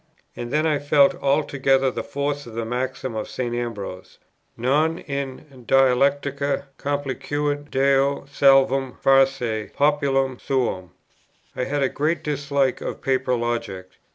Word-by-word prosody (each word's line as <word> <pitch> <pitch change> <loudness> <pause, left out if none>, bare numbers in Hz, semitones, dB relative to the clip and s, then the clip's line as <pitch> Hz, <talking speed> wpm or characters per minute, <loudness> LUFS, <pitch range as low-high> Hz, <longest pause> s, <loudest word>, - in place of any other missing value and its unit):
And 120 0 -6
then 155 +2 +1
I 150 -2 +1
felt 145 -1 +4
altogether 135 -2 +2
the - - -4
force 145 -1 -3
of 115 - -10
the 115 -1 -2
maxim 130 +1 -3
of 110 -1 -4
St. 120 -2 -3
Ambrose, 110 -6 -5 0.4
"Non 150 +7 +1
in 140 -2 -5 0.2
dialecticâ 140 +2 +2 0.2
complacuit 145 +1 -2
Deo 135 +1 +2
salvum 135 -2 +3
facere 135 -5 +2
populum 140 -3 +1
suum;" 120 -9 -1 0.7
I 125 - -1
had 145 0 -1
a - - +3
great 155 +5 -1
dislike 140 -2 0
of - - -6
paper 130 -1 +1
logic. 115 -6 -3
135 Hz, 125 wpm, -23 LUFS, 125-145 Hz, 0.7 s, felt